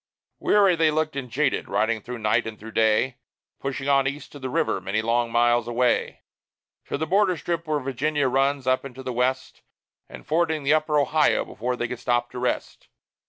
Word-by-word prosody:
Weary 200 -3 +4
they 160 -1 +3
looked 155 -1 -1
and 135 -3 -5
jaded, 135 +4 0
riding 110 +1 0
through 125 +3 -7
night 105 -1 +1
and 110 -2 -8
through 110 +1 -9
day; 110 +3 +2 0.4
Pushing 135 0 -4
on 135 -1 +3
East 140 +1 -5
to 145 - -10
the 130 -1 -4
river, 95 - 0
many 100 +3 -1
long 115 +1 0
miles 120 0 +3
away, 120 +1 0 0.6
To - - -3
the 160 - -2
border 185 +1 +2
strip 170 +1 -3
where 155 -1 0
Virginia 140 +2 -1
runs 135 +1 +1
up 130 0 +2
into 130 -1 -9
the 130 - -4
West, 130 +2 -1 0.5
And - - -11
fording 160 -1 0
the 140 +2 +3
Upper 155 -1 +1
Ohio 150 +1 +2
before 125 +2 -3
they 120 -1 -2
could 120 0 -6
stop 120 -1 0
to - - -6
rest. 125 - -3
130 Hz, 195 wpm, -24 LUFS, 120-150 Hz, 0.6 s, Weary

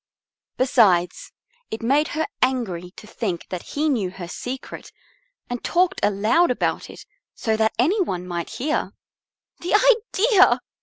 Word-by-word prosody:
Besides, 205 -9 +2 0.4
it 220 - -6
made 285 +6 +2
her 315 - +1 0.2
angry 220 -10 -1
to - - -12
think 205 -5 -4
that 180 -2 -4
he 300 +2 -2
knew 225 -11 0
her 180 -1 -8
secret 250 +8 -7 0.6
and 245 -1 -5
talked 365 +2 +1
aloud 215 - +2
about 250 - -1
it - - -12 0.3
so 220 -1 -1
that 220 0 +1
any 345 - +2
one 180 - -3
might 170 -2 -4
hear. 300 +5 -2 0.7
"The 355 +4 0
idea!" 450 -3 +4
245 Hz, 140 wpm, -22 LUFS, 195-315 Hz, 0.7 s, idea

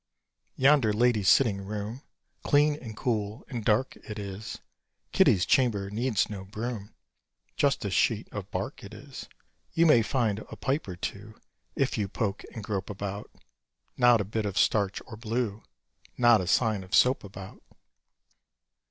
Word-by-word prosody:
Yonder 135 -4 +4
lady's 110 -3 +3
sitting 105 -7 +4
room 105 +5 -5 0.4
Clean 150 +1 +3
and 115 -7 -9
cool 110 -1 -2
and 120 -4 -4
dark 110 +5 +1
it 105 -1 -9
is: 100 +1 -6 0.5
Kitty's 90 - +4
chamber 105 -7 +2
needs 110 -2 0
no 100 -3 -7
broom 110 +1 -6 0.6
Just - - +1
a - - -2
sheet - - +1
of - - -6
bark - - -4
it - - -10
is. - - -10 0.4
You 165 - +4
may 150 -8 +6
find 110 -3 0
a - - -10
pipe 140 +1 -2
or 90 - -5
two 100 +4 -6 0.4
If - - 0
you 100 - 0
poke 100 0 -3
and 110 - -7
grope 100 -2 -3
about: 100 0 -5 0.7
Not 120 -2 +5
a - - -3
bit 105 +1 -2
of 100 - -5
starch 100 -2 +2
or 110 - -10
blue 115 -1 -2 0.6
Not 120 -4 +5
a 90 - -4
sign 110 -1 +2
of 95 - -2
soap 125 +1 +4
about. 95 -1 -10
110 Hz, 155 wpm, -28 LUFS, 100-120 Hz, 0.7 s, may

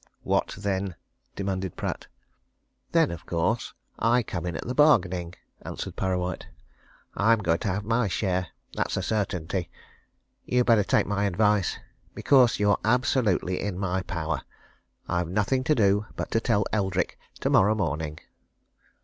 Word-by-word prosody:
"What - - 0
then!" 95 -2 -2 0.4
demanded 95 -2 -3
Pratt. - - -4 0.8
"Then, - - +3
of 85 - -8
course, 90 +8 -1 0.2
I 120 +1 +3
come 90 -4 -4
in 85 - -3
at - - -5
the 125 - -2
bargaining," 95 - +3 0.3
answered - - -6
Parrawhite. 90 -1 -2 0.7
"I'm 115 +3 +4
going 85 -6 +1
to - - -3
have 100 +2 -1
my 115 +1 +1
share. 95 -1 -1 0.3
That's - - -1
a - - -1
certainty. 95 -4 -2 0.7
You'd 125 0 +1
better 115 -4 +5
take - - +2
my 100 0 0
advice. 105 0 +2 0.4
Because 130 -5 +4
you're 105 -1 +3
absolutely 115 -6 +1
in 100 -3 -3
my 95 -1 -1
power. 85 -4 -3 0.7
I've 85 -1 0
nothing 105 +7 +1
to 155 - +3
do 105 -1 +2
but - - -4
to 115 - +3
tell 110 -3 +1
Eldrick 95 -3 0 0.2
tomorrow 105 +3 +4
morning." 75 -6 -2
100 Hz, 140 wpm, -26 LUFS, 90-110 Hz, 0.8 s, better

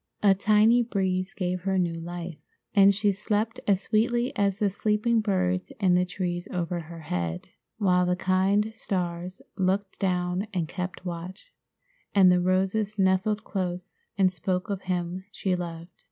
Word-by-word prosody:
A 200 -2 +7
tiny 215 +4 +4
breeze 190 -4 -1
gave 180 -1 -2
her 190 +1 0
new 175 -2 +1
life, 170 0 -6 0.3
and 200 -1 +7
she 205 +1 +2
slept 210 +3 -1
as 195 -2 +3
sweetly 240 +4 +1
as 200 -1 +1
the 205 -2 +1
sleeping 215 +3 +1
birds 185 -3 0
in 190 -3 +3
the 180 0 +3
trees 175 -1 -3
over 175 -1 -2
her 165 0 -9
head, 85 - -3 0.3
while 180 -4 +3
the 180 - +2
kind 190 +4 +2
stars 180 -3 -4
looked 190 +1 0
down 180 +1 0
and 170 -3 0
kept 180 +1 -5
watch, 180 - -7 0.6
and 190 -2 +7
the 180 0 +3
roses 195 +3 0
nestled 195 +2 +2
close 185 -2 -4 0.2
and 190 -2 +3
spoke 180 +3 -2
of 195 -1 -3
him 180 0 -3
she 190 -2 -1
loved. 170 -1 -6
185 Hz, 155 wpm, -27 LUFS, 180-200 Hz, 0.6 s, A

